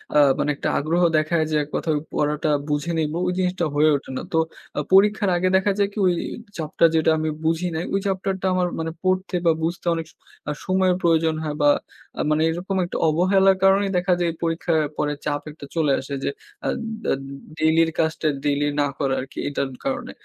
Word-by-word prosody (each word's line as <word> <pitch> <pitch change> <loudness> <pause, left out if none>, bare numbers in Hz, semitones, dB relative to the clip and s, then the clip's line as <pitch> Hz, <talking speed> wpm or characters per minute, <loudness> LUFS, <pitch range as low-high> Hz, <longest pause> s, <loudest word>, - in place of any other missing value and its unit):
আ - - +6 0.2
মানে 150 - +1
একটা - - -2
আগ্রহ 165 +5 0 0.2
দেখায় 155 +1 +1
যে - - +1
এক 145 - -11
কথায় 155 -2 0 0.2
পড়াটা 150 +1 0 0.2
বুঝে 145 +3 -1
নিবো, 155 +1 -1
ওই - - +1
জিনিসটা 180 -2 0
হয়ে 155 +1 +5
ওঠে 140 - -5
না। - - -3
তো - - +2 0.4
আ - - +2
পরীক্ষার 205 +1 +5
আগে 185 +1 +1
দেখা 195 +2 +3
যায় 200 - +3
কি? - - -13
ওই 180 - +3 0.4
চ্যাপ্টার 160 +1 +2
যেটা 160 0 +3
আমি 155 0 -1 0.2
বুঝি 165 +2 +1
নাই, 160 - -2
ওই 195 - +2
চ্যাপ্টারটা 190 0 -2
আমার 180 -1 +1
মানে 160 0 -2
পড়তে 185 0 0
বা 165 - +6
বুঝতে 170 +2 -2
অনেক 165 -1 -4
স - - -28 0.5
সময়ের 185 -1 +2
প্রয়োজন 165 -1 +2
হয় 150 -1 -3
বা 145 - +5 0.5
আ - - +2
মানে 155 +1 +2
এরকম 175 +4 -3
একটা 175 - -4
অবহেলার 190 +4 +4
কারণেই 195 +1 +4
দেখা 180 +1 +2
যায়, 175 -1 +1
এই - - -11
পরীক্ষার 165 0 0 0.2
পরে 150 0 0
চাপ 145 -1 -1
একটা 150 -1 -11
চলে 155 -4 +2
আসে 135 +1 -7
যে, - - 0 0.4
আ - - 0 0.5
আদ 135 - -3 0.4
ডেইলির 160 +1 +3
কাজটা 160 -1 0 0.2
ডেইলি 145 0 +1 0.2
না 145 - +2
করা 135 -3 0
আরকি 130 - -11
এইটার 140 -1 -2 0.2
কারণে। - - -2
165 Hz, 200 wpm, -23 LUFS, 155-185 Hz, 0.5 s, আ